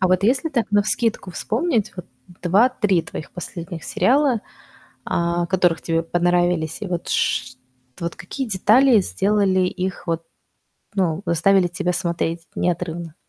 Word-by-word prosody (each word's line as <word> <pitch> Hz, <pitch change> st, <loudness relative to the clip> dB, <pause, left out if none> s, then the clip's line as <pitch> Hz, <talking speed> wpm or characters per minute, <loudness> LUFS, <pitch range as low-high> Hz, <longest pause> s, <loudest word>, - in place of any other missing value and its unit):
А 185 Hz, -, +2 dB
вот 185 Hz, 0 st, +2 dB
если 260 Hz, +8 st, +2 dB
так, 240 Hz, -6 st, -1 dB
навскидку, 205 Hz, -1 st, +1 dB
вспомнить, 230 Hz, -, -1 dB
вот, 180 Hz, -, -7 dB, 0.4 s
2-3 200 Hz, -1 st, +3 dB
твоих 150 Hz, -, -8 dB
последних 170 Hz, -1 st, -7 dB
сериала, 265 Hz, -3 st, +2 dB, 0.7 s
а, 170 Hz, 0 st, 0 dB
которых 180 Hz, -3 st, +1 dB
тебе 165 Hz, -1 st, 0 dB
понравились, 175 Hz, 0 st, +1 dB
и 210 Hz, -, -4 dB
вот 175 Hz, -2 st, -4 dB
ш 125 Hz, 0 st, 0 dB, 0.4 s
т -, -, -9 dB
вот 170 Hz, -, -3 dB
какие 265 Hz, +8 st, -5 dB
детали 225 Hz, +5 st, +4 dB
сделали 195 Hz, -1 st, +1 dB
их 185 Hz, 0 st, -2 dB
вот 165 Hz, 0 st, -1 dB, 0.7 s
ну, 180 Hz, -2 st, 0 dB
заставили 180 Hz, +2 st, +3 dB
тебя 180 Hz, +1 st, -1 dB
смотреть 170 Hz, -2 st, -1 dB
неотрывно? 170 Hz, -2 st, -2 dB
180 Hz, 135 wpm, -21 LUFS, 170-210 Hz, 0.7 s, детали